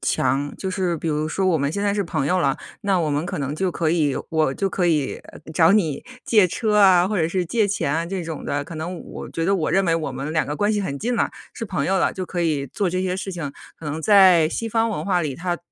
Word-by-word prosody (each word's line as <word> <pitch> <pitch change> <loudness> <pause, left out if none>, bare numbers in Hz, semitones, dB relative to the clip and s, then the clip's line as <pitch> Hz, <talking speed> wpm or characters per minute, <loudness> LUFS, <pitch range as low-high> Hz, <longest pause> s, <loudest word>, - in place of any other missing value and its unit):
强。 145 +2 0
就 190 - -4
是 185 -2 -1
比 165 - -4
如 155 0 -1
说 190 +4 0
我 175 -4 +3
们 140 0 0
现 200 +6 -3
在 205 -1 +2
是 205 0 0
朋 160 -6 -2
友 185 +4 +2
了， 140 -3 +1 0.2
那 195 -2 +1
我 160 -3 0
们 145 +3 -1
可 - - -4
能 140 0 -2
就 185 +3 0
可 165 -2 0
以 155 -5 +1
我 155 -4 +1
就 195 - -1
可 180 -1 0
以， 150 -5 +1
呃， - - -14
找 160 +2 +5
你 170 -9 +1 0.2
借 210 -5 +5
车 215 +3 0
啊、 185 -3 +6
或 210 -1 -1
者 160 - +1
是 180 +1 -1
借 205 +4 +1
钱 150 -7 0
啊 165 +1 -1
这 185 -2 -4
种 160 -3 -6
的。 145 0 -1
可 160 - -9
能 170 +3 -4
我 - - -8
觉 165 - -2
得 195 +3 +2
我 170 -5 0
认 195 +1 +3
为 165 -3 +2
我 160 -4 -2
们 135 +4 -5
两 155 - +1
个 150 +1 -3
关 205 +1 +1
系 210 - 0
很 140 -8 -3
近 245 - -1
了， - - +1 0.2
是 230 - -6
朋 195 - -2
友 190 0 +1
了， - - +1
就 185 - -3
可 175 0 -4
以 150 -5 0
做 185 +8 -1
这 185 +1 -1
些 185 -1 -1
事 190 +1 -4
情。 165 -6 -5 0.3
可 - - -11
能 150 +1 -3
在 185 -4 +6
西 230 - -3
方 225 +1 +2
文 220 - -3
化 185 -3 +1
里， 150 -5 -2
它 175 +3 -3
175 Hz, 300 characters per minute, -22 LUFS, 155-195 Hz, 0.3 s, 啊